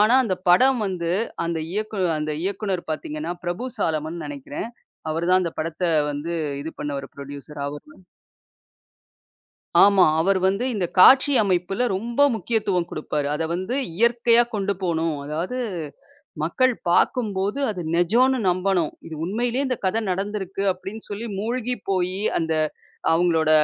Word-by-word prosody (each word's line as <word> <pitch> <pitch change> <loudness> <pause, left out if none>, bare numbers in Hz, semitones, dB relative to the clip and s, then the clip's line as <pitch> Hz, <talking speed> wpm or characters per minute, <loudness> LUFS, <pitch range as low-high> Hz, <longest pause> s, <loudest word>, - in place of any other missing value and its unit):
ஆனா 215 +4 +5
அந்தப் 185 -3 -3
படம் 255 +7 +5
வந்து, 175 -3 -2 0.3
அந்த 170 -1 -2
இயக்கு 215 0 -3 0.2
அந்த 155 0 -2
இயக்குநர் 195 -3 -2
பாத்தீங்கன்னா, 155 +2 -4
பிரபு 175 +9 -3
சாலமன்னு 160 +1 -2
நெனைக்கிறேன். 145 - -6 0.4
அவர் 165 +2 -1
தான் 185 - +6
அந்தப் 170 -2 -5
படத்தை 165 +3 -1 0.2
வந்து 145 +4 -4 0.3
இது 160 - -5
பண்ணவரு, 140 -2 -4
ப்ரொட்யூசர் 140 +1 -9
அவரு. 145 +1 -9 1.9
ஆமா. 200 -2 +6 0.2
அவர் 195 +2 +2
வந்து 195 +6 0
இந்த 190 -4 0
காட்சி 265 +7 +8
அமைப்புல 195 +5 0
ரொம்ப 235 +6 -4 0.2
முக்கியத்துவம் 195 -4 0
கொடுப்பாரு. 145 -2 -2
அத 160 - -2
வந்து 185 +8 -2 0.2
இயற்கையா 235 +1 +5
கொண்டு 200 0 0
போணும். 165 -3 0
அதாது 165 - -3 0.9
மக்கள் 255 +11 +2 0.2
பாக்கும்போது, 205 +1 +1
அது 185 -4 -5
நெஜோன்னு 235 +10 +3
நம்பனும். 180 -3 +1 0.2
இது 160 - -7
உண்மையிலியே 240 +7 -1
இந்த 255 -2 -1
கதை 205 +4 +1
நடந்திருக்கு 195 0 -3
அப்படின்னு 195 +4 -9
சொல்லி 215 +3 -4
மூழ்கிப்போயி 205 -5 -1 0.2
அந்த 160 -1 -1 0.6
அவுங்ளோட 165 -2 +2
185 Hz, 130 wpm, -23 LUFS, 165-220 Hz, 1.9 s, காட்சி